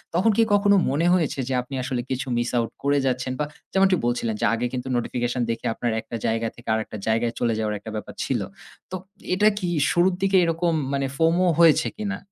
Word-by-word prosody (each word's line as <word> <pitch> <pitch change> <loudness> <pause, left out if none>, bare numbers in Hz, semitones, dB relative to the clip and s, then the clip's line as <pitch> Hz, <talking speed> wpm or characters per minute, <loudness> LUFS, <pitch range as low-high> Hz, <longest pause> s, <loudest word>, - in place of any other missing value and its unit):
তখন 200 +6 +4
কি 230 - +6
কখনো 200 0 +4
মনে 150 +6 +1
হয়েছে 165 -6 0
যে - - 0
আপনি 125 +2 -8
আসলে 125 -1 -2
কিছু 135 +1 -3
miss 120 0 -1
out 115 -1 0
করে 140 +1 +2
যাচ্ছেন? 130 0 -1
বা 150 - +1 0.3
যেমনটি 190 -1 +4
বলছিলেন 120 -2 -1
যে - - +2
আগে 115 +1 -1
কিন্তু 125 0 -4
নোটিফিকেশন 120 +1 -2
দেখে 115 - -3
আপনার 120 +1 -2
একটা 115 - -8
জায়গা 115 0 0
থেকে 120 - -16
আরেকটা 110 -1 -3
জায়গায় 115 +1 +1
চলে 120 -1 +1
যাওয়ার 105 -1 -1
একটা 110 - -8
ব্যাপার 105 - -6
ছিল। - - -1 0.5
তো - - -3 0.4
এটা 205 +3 +4
কি 180 - -2 0.2
শুরুর 180 +1 +3
দিকে 195 0 +3
এরকম 170 0 +1 0.2
মানে 140 0 0
FOMO 165 +4 +3
হয়েছে 160 -1 +5
কিনা? 205 -2 -3
135 Hz, 205 wpm, -24 LUFS, 120-175 Hz, 0.5 s, কি